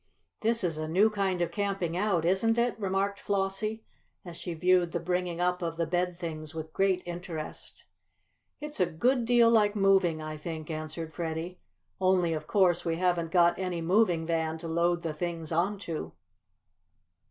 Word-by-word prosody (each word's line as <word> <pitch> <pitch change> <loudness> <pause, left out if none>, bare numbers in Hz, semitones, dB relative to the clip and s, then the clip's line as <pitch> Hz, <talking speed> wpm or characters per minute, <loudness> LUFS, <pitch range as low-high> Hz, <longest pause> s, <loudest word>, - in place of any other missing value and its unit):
"This 230 -1 +1
is 165 -3 -1
a 155 - -3
new 195 +7 +4
kind 190 -4 0
of 170 - -3
camping 195 -5 -2
out, 185 -3 +1
isn't 195 +6 +3
it?" 235 0 +2
remarked 200 0 -1
Flossie, 200 +2 -2 0.4
as 175 -2 -8
she 170 0 -5
viewed 180 0 +3
the 170 - 0
bringing 180 0 -2
up 180 0 +1
of 165 -1 -3
the 170 - +1
bed 175 +1 -1
things 155 -3 -6
with 160 0 -6
great 190 -2 +1
interest. 175 -3 -6 0.7
"It's 300 -3 -6
a 180 - +3
good 240 +9 +1
deal 235 -1 +5
like 210 -2 +4
moving, 195 -5 +3
I 155 0 -5
think," 160 0 -6
answered 155 +1 -5
Freddie. 165 +2 -4 0.4
"Only, 185 -3 +3
of 155 -1 -4
course, 180 -4 +3
we 165 -1 0
haven't 175 -1 0
got 175 +1 +4
any 180 -2 -2
moving 175 -1 +2
van 160 -1 -1
to 165 - -7
load 170 +1 +1
the 160 -2 -2
things 165 0 -4
on 180 +6 +1
to." 155 - -5
175 Hz, 175 wpm, -29 LUFS, 165-195 Hz, 0.7 s, deal